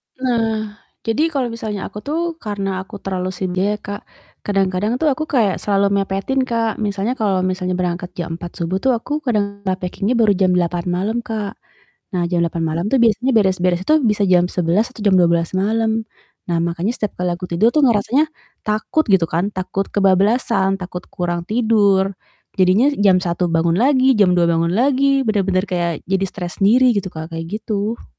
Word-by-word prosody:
Nah, 225 -4 -1 0.2
jadi 225 +8 +1
kalo 270 -7 -2
misalnya 215 -3 -5
aku 210 - -7
tuh, 330 +6 -3
karena 195 -3 -3
aku 195 +3 -11
terlalu 185 -1 -2
sendiri 185 +3 -1
ya - - -9
Kak, 205 0 -7 0.4
kadang-kadang 195 +2 0
tuh 300 +3 +2
aku 310 +3 -3
kayak 225 -10 +1
selalu 200 -1 +1
mepetin 195 +7 -1
Kak, 230 -2 -1
misalnya 205 +2 -1
kalo 195 -4 +1
misalnya 185 0 -1
berangkat 180 0 -3
jam 165 -1 -5
4.00 175 -1 -8
subuh 185 +3 -1
tuh 260 +3 +2
aku 295 +6 -3
kadang 205 -7 -1
nah, 185 - +2
packing-nya 195 +6 -2
baru 225 -3 +4
jam 185 -1 +2
8.00 175 -1 0
malam 190 +6 -1
Kak, 215 -3 -5 0.6
nah 175 - +1
jam 175 -1 0
8.00 170 0 -2
malam 160 +3 -2
tuh 270 - +3
biasanya 235 +4 +2
beres-beres 185 -3 +2
tuh 310 0 +4
bisa 210 -3 +2
jam 180 -2 +4
11.00 180 +6 +1
atau 220 - -11
jam 200 - +4
12.00 170 -1 +2
malam, 220 +2 0 0.4
nah 170 - +1
makanya 170 +5 -1
setiap 210 -4 -4
kali 180 0 0
aku 180 +1 -6
tidur 195 +7 +3
tuh 305 - +4
ngerasanya, 240 +5 +2 0.4
takut 215 +9 0
gitu 185 -4 +4
kan, 175 +5 -1
takut 190 +1 -3
kebablasan, 195 +1 +2
takut 180 0 -6
kurang 175 -1 -2
tidur, 205 -3 +2 0.4
jadinya 190 +8 +4
jam 195 -3 +4
1.00 175 -1 -1
bangun 165 0 +2
lagi, 260 +2 +4
jam 195 -4 +4
2.00 170 -1 +3
bangun 170 0 +1
lagi, 275 +4 +2
benar-benar 195 -3 +1
kayak 175 -2 0 0.2
jadi 195 0 +1
stres 175 -2 -7
sendiri 245 +4 +5
gitu 195 -1 -2
Kak, 160 +1 -7
kayak 165 +6 -4
gitu. 215 +2 -3
200 Hz, 180 wpm, -19 LUFS, 180-225 Hz, 0.6 s, sendiri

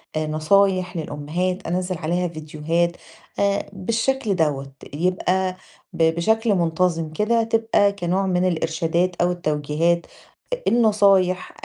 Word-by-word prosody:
آآ 155 0 -1
نصايح 185 +3 +2
للأمهات، 165 +5 -3
أنزِّل 180 +1 -2
عليها 175 +3 -1
فيديوهات 165 +2 -2 0.4
آآ 200 0 0
بالشكل 225 +3 -1
دوّة، 140 -5 -1 0.2
يبقى 185 +3 0 0.4
ب 165 - 0
بشكل 220 +4 +2
منتظم 165 -1 0
كده 225 +6 +1
تبقى 225 -2 +2
كنوع 195 -1 -1
من 185 -1 +1
الإرشادات، 170 +1 0
أو 175 0 +3
التوجيهات، 160 +1 0 0.5
أ - - +3
النصايح 200 -5 +3
180 Hz, 115 wpm, -22 LUFS, 165-200 Hz, 0.5 s, أو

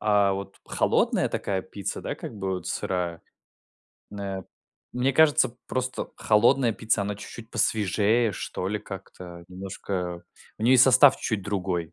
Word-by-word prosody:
а, 105 -2 +3
вот 100 0 -6
холодная - - +1
такая 95 -2 -2
пицца, 100 +1 -5
да, - - -4
как - - -8
бы, 95 -2 -2
вот 90 - -6
сырая. 90 -2 -2 0.9
На 100 -2 -5 0.5
мне 125 +2 +1
кажется, 155 -6 +4
просто 130 0 -3
холодная 115 +3 +3
пицца, 110 0 0
она 100 +1 -2
чуть-чуть 110 +2 -10
посвежее, 110 +2 +2
что 90 0 -4
ли, 105 +1 -1
как-то 90 -3 -10
немножко 90 -1 -5 0.3
у - - -7
нее 125 +3 +5
и - - +7
состав 130 +2 +7
чуть-чуть 105 -4 -2
другой. 90 -4 -2
100 Hz, 145 wpm, -26 LUFS, 95-115 Hz, 0.9 s, и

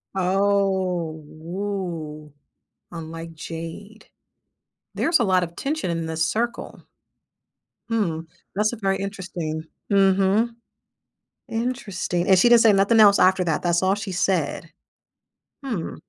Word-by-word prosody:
Oh, 190 -3 +1
ooh 165 -3 -5 0.6
"Unlike 165 0 -7
Jade." 165 +7 -8 0.9
There's 330 -2 +2
a - - +3
lot 185 -3 +3
of 170 0 -6
tension 295 - -2
in 165 -1 -2
this 160 0 -1
circle. 235 +6 -3 1.1
Hmm, 200 -9 0 0.4
that's 210 +2 +2
a 240 - -4
very 195 -2 0
interesting 180 -6 -5 0.3
mhm. 195 +3 +3 1.0
Interesting, 210 -7 -2
and 190 -1 +6
she 240 - +5
didn't 240 -1 +7
say 220 -1 +6
nothing 200 +3 +3
else 200 -2 +7
after 185 0 +4
that, 160 -3 -1
that's 175 0 +1
all 190 +1 +3
she 200 -1 -5
said? 185 +1 -1 0.9
Hmm. 220 -11 -3
190 Hz, 120 wpm, -23 LUFS, 165-205 Hz, 1.1 s, didn't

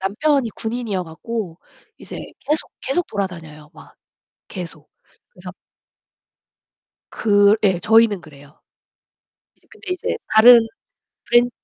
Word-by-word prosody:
남편이 240 +6 0
군인이어 220 -3 -4
갖고 180 +1 -6 0.4
이제 - - -9 0.2
계속 305 +1 -2
계속 310 +7 -1
돌아다녀요. 165 -7 -6
막 - - -16 0.5
계속. 165 -5 -9 0.4
그래서 180 0 -11 1.6
그 205 -1 +3
예. 190 -4 +2
저희는 220 -2 +3
그래요. 145 -2 -17 1.0
이제 - - -32
근데 385 - -9
이제 365 - -3 0.2
다른 230 +1 +8 0.6
브랜 240 0 +4
205 Hz, 225 characters per minute, -20 LUFS, 175-235 Hz, 1.6 s, 다른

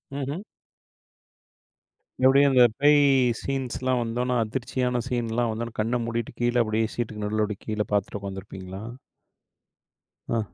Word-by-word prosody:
ம்ஹ்ம். 145 +7 -3 1.8
எப்படியும், 140 +2 +6
அந்தப் 120 -4 +6
பேய் 145 0 +6 0.4
சீன்ஸ் 135 -3 -3
எல்லாம் 130 -1 +1
வந்தவுடனே, 125 +2 -1
அதிர்ச்சியான 125 +1 -1
சீன் 120 -3 -1
எல்லாம் 120 0 +1
வந்தவுடனே, 115 +1 -5
கண்ண 115 +3 +1
மூடிட்டு, 115 0 -3
கீழே 120 0 +2
அப்படியே 110 0 0
சீட்க்கு 110 -3 -3
நடுவுல 105 -1 -1
கீழே 105 -1 -1
பார்த்துட்டு 100 0 0
உட்கார்ந்திருப்பீங்களா? 95 0 -7 1.5
ஆ. - - +2
120 Hz, 120 wpm, -25 LUFS, 110-125 Hz, 1.8 s, எப்படியும்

